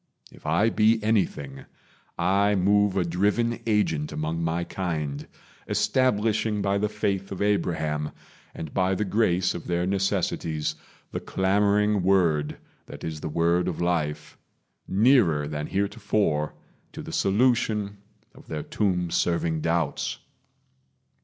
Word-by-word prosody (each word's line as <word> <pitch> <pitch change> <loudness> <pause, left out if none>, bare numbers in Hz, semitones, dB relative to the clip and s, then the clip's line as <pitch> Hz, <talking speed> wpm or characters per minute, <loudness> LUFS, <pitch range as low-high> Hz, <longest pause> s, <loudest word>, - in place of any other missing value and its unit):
If - - -12
I 100 +9 +3
be 110 +1 +4
anything, 90 -11 -1 0.5
I 100 +4 +2
move 100 +1 +3
a 90 - +2
driven 105 +7 +1
agent 85 -9 +1
among 80 +2 -2
my 85 +1 -1
kind, 75 -6 -3 0.4
Establishing 110 -4 +1
by 100 0 +1
the 105 +1 0
faith 100 -2 -2
of 95 - -5
Abraham, 80 -7 0 0.5
And 80 -3 -7
by 95 +1 +1
the 105 - -1
grace 95 -3 +1
of 85 - -7
their 85 0 0
necessities, 90 -5 -1 0.4
The - - -3
clamoring 100 +1 +2
word 85 -6 +2 0.3
that - - -10
is 80 -1 -4
the 80 - -4
word 85 +3 +1
of 90 - -3
life 85 -4 -2 0.5
Nearer 95 - +3
than 75 0 -4
heretofore 100 -5 0 0.4
to - - -7
the - - -8
solution 105 -1 +1 0.3
Of - - -17
their 75 -2 -4
tomb 90 -5 -1
serving 85 -2 0
doubts. 80 -3 -1
95 Hz, 125 wpm, -26 LUFS, 80-105 Hz, 0.5 s, be